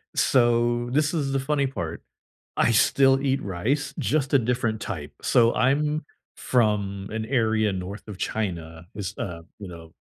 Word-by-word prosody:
So, 120 -1 +2
this 150 +4 +1
is 145 -5 -1
the 135 - +1
funny 140 0 0
part: 85 -11 -5 0.6
I - - +3
still 135 +4 +4
eat 135 0 0
rice, 125 +10 -2
just 140 -3 0
a 140 - +6
different 120 -2 -1
type; 75 -7 -5
so, 115 -1 +4
I'm 150 +4 +1 0.3
from 100 -5 0
an 110 0 -3
area 110 -4 +1
north 95 +3 -6
of 105 -3 -8
China, 85 -6 -4
it's 100 -1 -5
a, 85 -3 -5 0.2
you 100 - -7
know, 85 -2 -11
115 Hz, 155 wpm, -25 LUFS, 100-135 Hz, 0.6 s, a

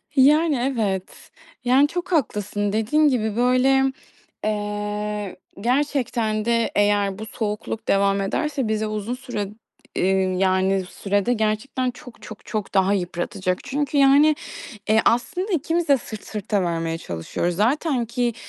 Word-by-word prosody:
Yani, 300 +3 +5 0.2
evet. 195 -5 -3 0.3
Yani, 260 +4 +5
çok 355 +3 -5
haklısın 205 - 0
dediğin 270 +8 +3
gibi, 220 -6 0
böyle, 255 +2 +3 0.6
eee, 210 -1 -3 0.3
gerçekten 240 -4 0
de 230 -1 +1
eğer 205 -1 +2
bu 220 - -5
soğukluk 215 0 -4
devam 200 0 +3
ederse, 275 +5 -1
bizi 215 0 0
uzun 215 +2 -3
süre 245 -6 -4 0.5
eee, 190 +1 +2 0.3
yani, 190 0 +2
sürede 200 +4 0
gerçekten 240 +4 -1
çok 245 0 -14
çok 215 - -11
çok 215 -2 -4
daha 195 +1 +3
yıpratacak. 180 0 -2
Çünkü, 285 +2 -1
yani, 285 +2 +6 0.5
eee, 220 +1 +5
aslında 360 - +1
ikimiz 335 0 0
de 280 - +5
sırt 220 -3 -9
sırta 205 -2 -1
vermeye 165 -1 -1
çalışıyoruz. 165 - -3
Zaten 250 - +1
ki, 240 0 -1
220 Hz, 130 wpm, -23 LUFS, 205-265 Hz, 0.6 s, yani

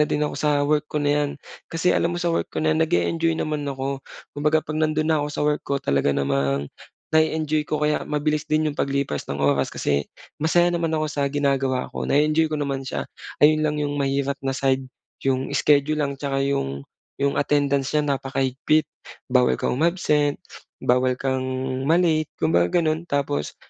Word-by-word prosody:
na - - +6
din 150 - 0
ako 150 - -3
sa 150 -1 +2
work 150 0 +1
ko - - -5
na 145 0 +1
'yan. 145 -1 +1 0.4
Kasi 165 +2 +2
alam 170 - +1
mo - - -3
sa 175 - 0
work - - -1
ko - - -2
na 155 - +3
'yan 160 - 0
nag-e-enjoy 165 0 +1
naman 150 -1 -2
ako. 135 0 -3 0.4
Kumbaga 150 +2 +2
'pag 155 - -4
nando'n 155 0 +1
na 155 -2 +3
ako 150 - -3
sa - - -4
work 150 0 +1
ko 140 - -1
talaga 70 - +1
namang 70 0 0 0.5
na-e-enjoy 155 -1 +2
ko 150 0 -2
kaya 150 0 +1
mabilis 150 0 -1
din 155 0 +1
'yong 145 - -6
paglipas 140 - -1
ng 70 0 -3
oras 70 -1 +1
kasi 70 0 0 0.4
masaya 175 +2 +4
naman 165 -1 0
ako 155 -1 0
sa 145 -1 -1
ginagawa 135 -3 0
ko, - - -4
na-e-enjoy 155 +2 +2
ko 155 - -1
naman 140 -2 -2
siya. 130 - -4 0.3
Ayun 155 +1 +5
lang 150 -1 0
'yong 145 0 -2
mahirap 140 0 0
na 135 - 0
side, 130 0 0 0.4
'yong 135 -1 0
schedule 150 +1 +3
lang 140 -1 -4
'tsaka 135 -1 -1
'yong, 70 - -2 0.4
'yong 140 0 +1
attendance 140 -1 +1
niya 150 - +3
napakahigpit. 135 +2 0 0.5
Bawal 125 -1 +4
kang - - 0
umabsent, 150 -3 +2 0.5
bawal 125 +1 +3
kang 130 0 -1 0.4
ma-late, 160 -2 +3
kumbaga 85 - +3
gano'n. 160 +1 -1
Tapos, 140 - -1
145 Hz, 185 wpm, -23 LUFS, 135-155 Hz, 0.5 s, na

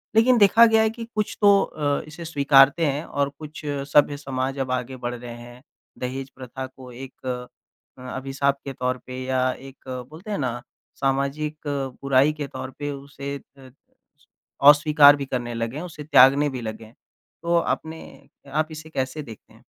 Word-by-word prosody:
लेक़िन 240 +2 +5
देखा 220 +3 +7
गया 225 -1 +4
है 220 - +3
कि 230 +1 -7
कुछ 215 -1 -2
तो 200 -1 +6
अ, 145 -2 -1
इसे 165 +2 -9
स्वीकारते 145 +1 +5
हैं 145 +1 -1
और 140 0 -1
कुछ 155 0 -9 0.3
सभ्य 145 -1 +5
समाज 135 -1 -3
अब 130 -1 -2
आगे 130 +1 -2
बढ़ 120 - -2
गए 120 0 -10 0.2
हैं। 120 +1 -13 0.4
दहेज़ 130 +2 -4
प्रथा 130 0 -7
को 130 -1 -13
एक 130 +2 -11 0.7
अ, 125 - -12
अभिशाप 135 +1 -1
के 135 - -5
तौर 125 0 -1
पे 130 0 -6
या 130 0 +1
एक 135 0 -13 0.2
बोलते 170 +8 -9
हैं 205 - -1
ना, 120 -3 -2 0.3
सामाजिक 140 +3 -1 0.4
बुराई 140 +2 +3
के 145 -2 -5
तौर 130 0 -7
पे 145 0 -3
उसे 140 0 -7
अ 135 -1 -17 0.5
स 150 - -29 0.4
अस्वीकार 145 -1 +7
भी 140 -1 -4
करने 120 -2 -3
लगे 115 +3 -3
हैं, 160 - -5
उसे 155 -4 -8
त्यागने 145 0 +6
भी 125 - -4
लगे 110 0 -6
हैं। 110 - -18 0.5
तो 170 0 +1
आपने 160 -1 -2 0.5
आप 155 +3 0
इसे 155 0 -9
कैसे 135 0 -3
देखते 115 -6 -12
हैं? - - -21
140 Hz, 180 wpm, -24 LUFS, 130-155 Hz, 0.7 s, देखा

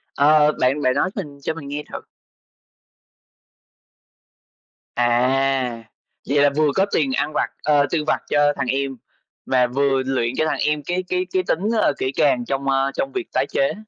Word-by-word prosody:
Ờ, 150 +1 +5
bạn 135 +4 +1
bạn 130 -2 +2
nói 165 +6 +1
mình 140 -2 -7
cho - - -2
mình 145 -3 -9
nghe 145 +1 -4
thử. - - -4 3.0
À! 125 0 +1 0.5
Vậy 145 - +2
là 145 - +5
vừa 155 -1 +3
có 195 - +3
tiền 135 -4 +1
ăn 145 +3 -1
vặt, - - 0
ờ, 145 -1 +3
tiêu 160 -3 0
vặt 155 - +1
cho 145 0 +3
thằng 135 -2 -3
em 135 0 -2 0.5
và 125 -1 +2
vừa 135 +1 +1
luyện 130 -2 -1
cho 155 - +2
thằng - - -1
em 150 -1 0
cái 180 +4 -2
cái 180 +1 -1
cái 185 -1 +1
tính, 160 - +1 0.2
ơ, - - +2
kỹ 130 - -1
càng 130 -4 +1
trong, 135 +2 -2
ơ, 135 0 +1
trong 275 - -2
việc 380 -3 -4
tái - - +1
chế. 275 +1 +1
140 Hz, 180 wpm, -21 LUFS, 130-150 Hz, 3.0 s, Ờ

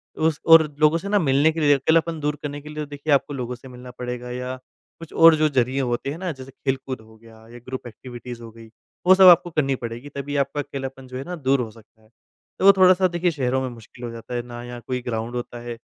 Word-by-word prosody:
उस 155 -1 0
और 165 -1 +8 0.2
लोगों 155 +2 +4
से 195 +4 -7
ना 205 - +3
मिलने 145 -1 +3
के 165 - -5
लिए 145 -1 +5
अकेलापन 160 +3 +1
दूर 150 0 -1
करने 145 0 -5
के 150 - -11
लिए 150 0 -5
तो - - -20
देखिए 145 +1 -1
आपको 140 +1 +1
लोगों 125 -2 -4
से 125 +2 -14
मिलना 125 0 -11
पड़ेगा 125 0 -6
या 125 +1 -4 0.4
कुछ 165 - -11
और 165 -1 +7
जो 155 0 +2
ज़रिए 130 0 +1
होते 120 +2 -2
हैं 155 - -6
ना 180 -1 -3
जैसे 135 -1 -10
खेल 135 0 -2
कूद 130 -3 -5
हो 110 0 -18
गया 115 0 -17 0.2
या 120 - -11
ग्रुप 130 0 -7
एक्टिविटीज़ 120 +1 -9
हो 115 - -9
गई, 115 0 -14 0.4
वो 185 - +8
सब 190 -1 +8
आपको 175 0 +7
करनी 135 -4 +1
पड़ेगी 120 +3 -7
तभी 145 +1 -4
आपका 140 +1 -1
अकेलापन 135 -2 -7
जो 130 0 -7
है 135 - -5
ना 180 +3 -6
दूर 135 -3 +1
हो 110 -3 -5
सकता 110 0 -21
है। 110 - -25 0.5
तो 190 - +1
वो 200 - +11
थोड़ा-सा 185 0 +5
देखिए 175 0 0
शहरों 130 -3 -1
में 130 - -3
मुश्किल 120 +1 -11
हो 120 - -5
जाता 115 +1 -8
है, 120 - -1
ना 120 0 -9
यहाँ 120 0 -8
कोई 125 -1 -2
ग्राउंड 115 0 -4
होता 120 0 -5
है, 120 -1 -7
135 Hz, 260 wpm, -23 LUFS, 120-155 Hz, 0.5 s, वो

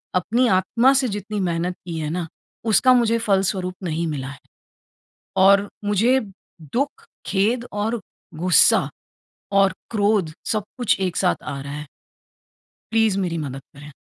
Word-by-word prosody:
अपनी 230 +8 +2
आत्मा 235 +8 +3
से 265 -1 +2
जितनी 205 0 -4
मेहनत 175 -1 -1
की 165 -2 -4
है 155 -1 -3
ना 170 +1 -3 0.4
उसका 230 +4 +5
मुझे 230 -2 +3
फलस्वरूप 190 -3 0
नहीं 165 -1 -2
मिला 140 -4 -4
है। 140 0 -9 1.0
और 200 +1 +5 0.2
मुझे 215 +6 +3 0.4
दुःख, 280 - -3 0.2
खेद 225 +5 +1
और 215 +3 -1 0.3
गुस्सा 180 +1 +4 0.6
और 195 -1 +4 0.2
क्रोध 205 -6 +1
सब 215 -1 0 0.2
कुछ 240 -5 +1
एक 185 -2 -1
साथ 180 - +1
आ 140 - -5
रहा 140 +1 -7
है। 150 +1 -6 1.1
प्लीज़ 225 -3 +2
मेरी 175 -3 -1
मदद 135 -3 -5
करें। 145 +1 -11
195 Hz, 140 wpm, -22 LUFS, 165-225 Hz, 1.1 s, उसका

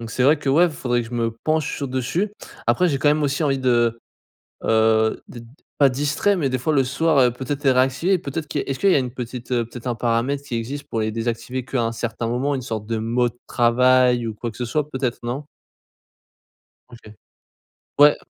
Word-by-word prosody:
Donc 115 -1 -7
c'est 125 - -1
vrai 145 +5 +5
que - - -4
ouais 165 +6 +4
faudrait 125 -4 -1
que 115 - -9
je - - -13
me 115 -1 0
penche 155 -2 0
sur 140 - -3
dessus. 135 - -2 0.3
Après 180 0 +3
j'ai 140 -4 0
quand 145 - +2
même 150 +1 +2
aussi 140 +2 0
envie 135 -2 +1
de, 120 -3 +2 0.7
heu, 110 0 +3
d 120 - -9 0.4
pas 140 - +6
distrait 145 +9 +1
mais, 150 -7 0
des 130 - 0
fois 140 +5 -1
le 135 -2 +4
soir 150 +4 +1
heu, 125 -2 +5
peut-être 135 +4 -5
les 135 - +5
réactiver, 130 +9 +2
peut-être 155 -1 -5
que 145 - -2
est-ce 135 -1 -3
qu'il 195 - +4
y - - +4
a - - +4
une 125 -2 -3
petite, 125 0 -7
heu, 120 -1 +2
peut-être 120 +2 -9
un 120 - -1
paramètre 120 +4 0
qui 135 -4 -5
existe 130 +6 -5
pour 115 - -2
les 110 0 -1
désactiver 115 +3 -3
qu'à 130 -1 -1
un 115 - -1
certain 115 0 -3
moment, 125 +5 0
une 135 - -2
sorte 110 -4 -5
de 115 +1 -2
mode 120 +2 0
travail 125 0 +3
ou 110 - -3
quoi 115 +2 -5
que - - -15
ce 125 - -2
soit 150 +5 -1
peut-être 130 -4 -2
non? 125 +5 -4 1.4
OK. 115 -3 -14 0.9
Ouais. 145 0 +8
130 Hz, 220 wpm, -22 LUFS, 120-140 Hz, 1.4 s, Ouais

